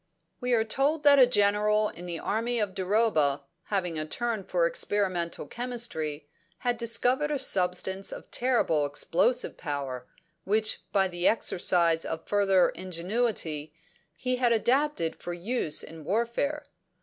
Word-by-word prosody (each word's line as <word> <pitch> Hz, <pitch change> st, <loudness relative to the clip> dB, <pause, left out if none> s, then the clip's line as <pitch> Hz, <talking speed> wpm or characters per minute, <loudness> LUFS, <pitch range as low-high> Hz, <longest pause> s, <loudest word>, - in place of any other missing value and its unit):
"'We 250 Hz, 0 st, -1 dB
are 225 Hz, -2 st, +4 dB
told 280 Hz, +7 st, 0 dB
that 285 Hz, -1 st, +7 dB
a 255 Hz, -, +8 dB
General 210 Hz, -1 st, +3 dB
in 175 Hz, +1 st, -9 dB
the 170 Hz, -1 st, -3 dB
army 230 Hz, +7 st, -1 dB
of 205 Hz, -4 st, -1 dB
Duroba, 185 Hz, -8 st, +1 dB, 0.2 s
having 180 Hz, -6 st, -2 dB
a 155 Hz, -, -2 dB
turn 230 Hz, +3 st, -2 dB
for 175 Hz, -2 st, +1 dB
experimental 180 Hz, -1 st, -1 dB
chemistry, 195 Hz, -12 st, -3 dB, 0.3 s
had 245 Hz, -1 st, -1 dB
discovered 250 Hz, +5 st, +1 dB
a 295 Hz, -, 0 dB
substance 190 Hz, -5 st, -1 dB
of -, -, -9 dB
terrible 235 Hz, -, +1 dB
explosive 245 Hz, -, 0 dB
power, 135 Hz, -3 st, -4 dB, 0.4 s
which, 215 Hz, +2 st, 0 dB
by 195 Hz, -1 st, +3 dB
the 175 Hz, -1 st, 0 dB
exercise 170 Hz, -6 st, +2 dB
of 160 Hz, 0 st, -5 dB
further 195 Hz, -3 st, +3 dB
ingenuity, 180 Hz, -3 st, -3 dB, 0.4 s
he 250 Hz, +8 st, -1 dB
had 245 Hz, -1 st, +2 dB
adapted 245 Hz, -, +1 dB
for 175 Hz, -, -4 dB
use 180 Hz, -3 st, -1 dB
in 160 Hz, -1 st, -10 dB
warfare. 235 Hz, -, -1 dB
205 Hz, 135 wpm, -28 LUFS, 170-240 Hz, 0.4 s, a